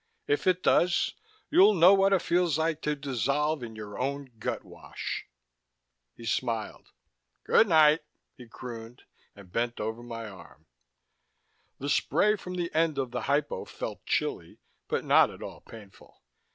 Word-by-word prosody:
If 430 - 0
it 185 0 +2
does, 175 0 +3 0.4
you'll 200 +3 +6
know 180 +2 +7
what 195 0 +4
it 195 - +3
feels 170 -3 +2
like 160 -1 -1
to 150 0 -1
dissolve 140 +2 -1
in 115 -2 -7
your 105 -1 -8
own 140 0 -3
gutwash...." - - -5 0.9
He 115 - -11
smiled. 115 -1 -2 0.5
"Good 225 - +4
night," 155 -3 +6 0.4
he 125 - -13
crooned, 115 0 -9 0.3
and 100 -3 -15
bent 120 +3 -1
over 110 +2 -3
my 115 -2 -7
arm. 95 -4 -14 1.1
The 140 - -5
spray 170 +8 +2
from 180 -3 -7
the 175 -1 -3
end 160 -2 +1
of 130 -3 -2
the 125 -1 -3
hypo 145 +1 0
felt - - -7
chilly, - - -2 0.3
but - - -2
not - - +5
at - - -10
all - - -9
painful. 105 -4 -15
140 Hz, 150 wpm, -28 LUFS, 115-170 Hz, 1.1 s, know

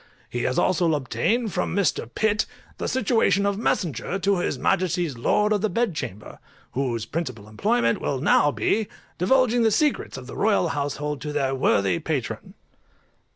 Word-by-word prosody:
He 120 - -2
has 130 - 0
also 170 -3 +2
obtained 170 - -1
from - - -1
Mr. 185 - 0
PITT 215 - +1 0.3
the - - -2
situation 225 -4 +2
of 200 0 0
messenger 180 - -1
to 195 -1 +1
his - - -1
Majesty's 175 -5 0
lords 210 - +2
of 205 - 0
the 215 - +1
bed 230 -4 0
chamber, 115 -9 -7 0.3
whose 120 -4 -2
principal 125 -7 -5
employment 115 +2 +1
will 135 - -1
now 145 +1 +4
be, 210 +8 0 0.3
divulging 245 +5 +3
the 225 - +4
secrets 295 - 0
of 130 - -8
the 130 - -9
Royal 200 -5 +2
household 145 -1 -3
to 150 - -4
their 135 -2 0
worthy 100 -8 +2
Patron. - - -4
165 Hz, 160 wpm, -24 LUFS, 130-210 Hz, 0.3 s, now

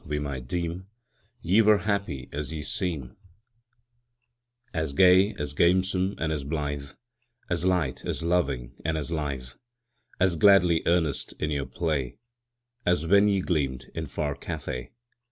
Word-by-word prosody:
we 75 -3 -3
might 70 -4 -4
deem 85 +4 -3 0.6
Ye 95 +6 +4
were 105 -1 +5
happy 100 -12 -2
as 75 +1 -4
ye 80 -2 -4
seem 80 -8 -3 1.6
As 80 -4 -2
gay, 95 +5 +5
as 75 -5 -4
gamesome, 95 +4 +2
and 80 0 -1
as 75 -3 -2
blithe, 70 -1 -3 0.6
As 85 0 0
light, 90 -8 0
as - - -3
loving, 70 -9 0
and 80 0 0
as 75 +1 -4
lithe, 70 -6 -3 0.7
As 90 -3 +3
gladly 90 -4 +5
earnest 85 -5 +1
in 75 - -1
your 70 -3 -2
play, 70 -1 -2 0.7
As 90 -3 +1
when 100 +4 +5
ye 100 -2 +2
gleamed 70 -8 -2
in 80 -1 -4
far 70 +1 -2
Cathay. 60 -2 -5
80 Hz, 140 wpm, -27 LUFS, 70-90 Hz, 1.6 s, were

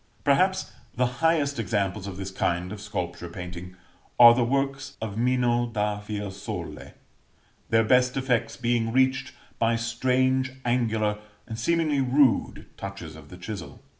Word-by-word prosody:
Perhaps 185 +7 +2 0.2
the 125 0 +2 0.2
highest 150 -5 +2
examples 100 -2 -1
of 95 -2 -6
this 95 0 -5
kind 90 0 -1
of 105 - -8
sculpture 85 - -5
painting 90 0 -8 0.4
are 120 -1 +11
the 120 +1 +2
works 135 +2 -1
of 110 -3 -5
Mino 120 0 +1
da 105 -2 -1
Fiesole; 105 -2 -6 0.8
their 115 0 +4
best 125 +3 +3
effects 130 -3 0
being 120 -2 0
reached 130 +2 +1 0.3
by 115 0 +2
strange 130 +3 +1
angular, 110 -3 +1 0.3
and 110 -1 -6
seemingly 155 +1 +1
rude, 130 0 +2
touches 100 -5 -7
of 75 -1 -13
the 90 - -11
chisel. 95 0 -7
115 Hz, 135 wpm, -26 LUFS, 100-130 Hz, 0.8 s, are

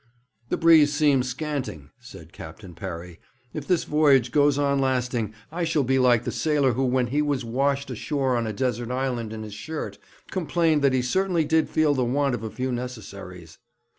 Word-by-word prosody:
'The - - 0
breeze 160 -3 +6
seems 145 -4 +2
scanting,' 130 - -5
said 100 -10 -13
Captain 90 +3 -10
Parry. 85 -1 -7 0.3
'If 150 -2 -6
this 180 -3 +2
voyage 140 -5 +3
goes 145 +1 +3
on 140 -1 +1
lasting, 125 -4 0 0.2
I 175 +2 -3
shall 160 -3 +1
be 130 +1 +1
like 120 -2 +4
the - - -3
sailor 145 -5 +1
who, 130 +4 -1
when 125 0 +1
he 150 - +2
was 145 -4 -1
washed 140 +3 -1
ashore 135 +1 -1
on 115 -1 -1
a - - -2
desert 120 +1 -2
island 125 -3 -2
in 110 0 -6
his 105 -1 -8
shirt, 155 +10 -6 0.3
complained 165 -4 +1
that 140 -2 +3
he 130 -1 +1
certainly 180 +4 +1
did 160 +1 +2
feel 155 -2 +2
the 130 -2 0
want 135 +2 +1
of 120 - -3
a 110 - -4
few 130 +3 -3
necessaries.' 100 -9 -7
130 Hz, 190 wpm, -25 LUFS, 120-145 Hz, 0.3 s, breeze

